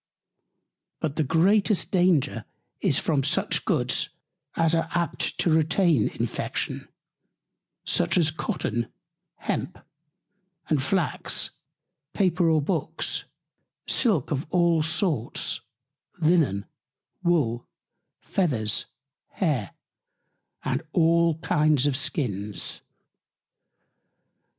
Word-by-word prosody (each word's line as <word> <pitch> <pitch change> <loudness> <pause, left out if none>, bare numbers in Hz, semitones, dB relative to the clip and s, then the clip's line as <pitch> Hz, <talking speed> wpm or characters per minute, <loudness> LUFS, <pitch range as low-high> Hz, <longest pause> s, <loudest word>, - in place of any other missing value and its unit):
But 150 -2 -2
the 155 - +1
greatest 195 - +2
Danger 180 -6 +2 0.3
is - - +2
from 145 -4 +1
such 140 - 0
Goods, - - +1 0.5
as 165 -1 +2
are 165 0 +1
apt 170 -1 -1
to 170 - +2
retain 160 - +3
Infection, - - -2 1.0
such 85 - +1
as 160 -3 +3
Cotton, 120 -7 -2 0.5
Hemp - - -3 0.9
and 150 -4 +1
Flax, 160 -1 0 0.6
Paper 180 -3 +2
or 155 -2 +3
Books, 165 -2 -2 0.6
Silk 200 - +1
of 145 +1 -2
all 170 -2 +3
sorts, 155 - -1 0.6
Linen, 155 - +2 0.6
Wool, 145 -10 +1 0.5
Feathers, 120 - 0 0.5
Hair, 145 - 0 1.0
and 130 +2 0
all 170 -1 +3
kinds 150 -2 +2
of 145 -2 +2
Skins. 105 - -1
160 Hz, 90 wpm, -26 LUFS, 135-175 Hz, 1.0 s, retain